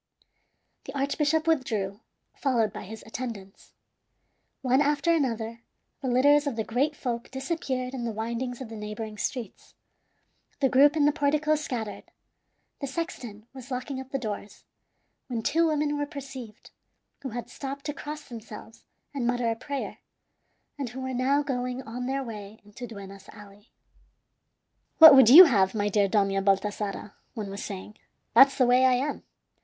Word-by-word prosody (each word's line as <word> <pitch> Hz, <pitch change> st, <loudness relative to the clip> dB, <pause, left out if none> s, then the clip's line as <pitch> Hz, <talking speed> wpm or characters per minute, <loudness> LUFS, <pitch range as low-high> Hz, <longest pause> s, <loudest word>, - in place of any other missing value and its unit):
The 270 Hz, +1 st, -6 dB
archbishop 300 Hz, +3 st, +1 dB
withdrew, 220 Hz, -11 st, -1 dB, 0.4 s
followed 235 Hz, -7 st, 0 dB
by -, -, -7 dB
his 220 Hz, +3 st, -9 dB
attendants. 225 Hz, -5 st, -8 dB, 0.9 s
One 260 Hz, +2 st, +3 dB
after 295 Hz, +3 st, +2 dB
another 230 Hz, -6 st, -2 dB, 0.4 s
the 270 Hz, -, -3 dB
litters 285 Hz, +4 st, +4 dB
of 275 Hz, -, -2 dB
the 220 Hz, -, -1 dB
great 270 Hz, +8 st, 0 dB
folk 240 Hz, -4 st, -4 dB
disappeared 265 Hz, -2 st, -3 dB
in 255 Hz, -3 st, -4 dB
the 235 Hz, -, -2 dB
windings 235 Hz, +3 st, -4 dB
of 250 Hz, -, -7 dB
the 225 Hz, -, -8 dB
neighboring 210 Hz, 0 st, -6 dB
streets. 245 Hz, -7 st, -5 dB, 0.8 s
The 270 Hz, -, +3 dB
group 285 Hz, +4 st, +5 dB
in 295 Hz, -, +4 dB
the 295 Hz, -, +5 dB
portico 300 Hz, +1 st, +1 dB
scattered. 245 Hz, -9 st, -4 dB, 0.7 s
The 280 Hz, -, -4 dB
sexton 250 Hz, -, -6 dB
was 260 Hz, -1 st, -11 dB
locking 260 Hz, +1 st, -4 dB
up 265 Hz, -, -12 dB
the 275 Hz, -, -2 dB
doors, 210 Hz, -4 st, -6 dB, 0.6 s
when 235 Hz, -4 st, -3 dB
two 330 Hz, +6 st, +2 dB
women 300 Hz, -1 st, 0 dB
were 290 Hz, -, -1 dB
perceived, 265 Hz, -6 st, -9 dB, 0.5 s
who 270 Hz, -, -5 dB
had 240 Hz, +1 st, -6 dB
stopped 275 Hz, +3 st, -7 dB
to 295 Hz, -, -2 dB
cross 300 Hz, 0 st, -7 dB
themselves 225 Hz, -2 st, -11 dB, 0.3 s
and 260 Hz, -4 st, -2 dB
mutter 245 Hz, -1 st, +1 dB
a -, -, -2 dB
prayer, 275 Hz, +4 st, -5 dB, 0.8 s
and 270 Hz, -4 st, -3 dB
who 255 Hz, +3 st, -8 dB
were 260 Hz, 0 st, -4 dB
now 270 Hz, +4 st, +2 dB
going 250 Hz, -2 st, -3 dB
on 245 Hz, +2 st, -5 dB
their 270 Hz, +1 st, -1 dB
way 215 Hz, -3 st, -9 dB
into 210 Hz, +4 st, -9 dB
Duenas 195 Hz, -3 st, -11 dB
Alley. 205 Hz, 0 st, -15 dB, 1.3 s
"What 320 Hz, -3 st, +11 dB
would 265 Hz, -4 st, +8 dB
you 320 Hz, +9 st, +12 dB
have, 200 Hz, -, +3 dB
my 205 Hz, -1 st, 0 dB
dear 205 Hz, 0 st, +2 dB
Dona 195 Hz, -1 st, +1 dB
Baltasara?" 200 Hz, +1 st, -1 dB, 0.2 s
one 210 Hz, -4 st, -5 dB
was 200 Hz, -, -6 dB
saying. 200 Hz, +1 st, -8 dB, 0.4 s
"That's 270 Hz, +4 st, +7 dB
the 255 Hz, -, +4 dB
way 250 Hz, +1 st, +4 dB
I 255 Hz, -, +4 dB
am. 275 Hz, +4 st, -1 dB
250 Hz, 160 wpm, -27 LUFS, 220-280 Hz, 1.3 s, you